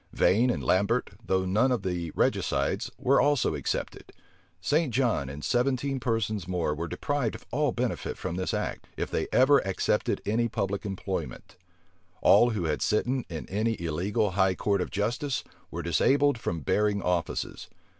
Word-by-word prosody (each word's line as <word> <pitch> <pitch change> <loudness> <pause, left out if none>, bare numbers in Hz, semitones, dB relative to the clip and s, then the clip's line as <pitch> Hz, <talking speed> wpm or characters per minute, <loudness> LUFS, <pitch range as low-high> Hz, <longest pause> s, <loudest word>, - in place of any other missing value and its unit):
Vane 115 +7 +3
and 120 - -1
Lambert, 100 +6 +1
though 95 -2 0
none 110 +8 +2
of 125 - 0
the 90 -3 -2
regicides, - - 0
were 135 +1 +3
also 145 - +2
excepted. 75 - -4 0.5
St. 145 - +1
John 115 - +1
and 70 +2 -7
seventeen 130 +2 0
persons 110 -6 -1
more 90 -4 0
were 85 +3 -4
deprived 140 - -2
of - - -12
all 145 +1 +1
benefit 120 0 -2
from 85 - -4
this 95 0 -2
act, - - -3
if - - -3
they - - -1
ever 135 +2 +5
accepted 95 -1 0
any 115 +3 +1
public 100 -1 -2
employment. 95 -2 -5 0.6
All 120 - +6
who 105 -6 -2
had 80 -2 -1
sitten 125 +4 0
in 80 -3 -6
any 110 +3 -1
illegal 90 +5 0
high 95 0 +2
court 100 0 0
of - - -3
justice 125 +6 -1 0.3
were - - -5
disabled 145 -2 +3
from 85 -7 -3
bearing 105 +7 +1
offices. 90 -2 -2
105 Hz, 160 wpm, -28 LUFS, 90-125 Hz, 0.6 s, All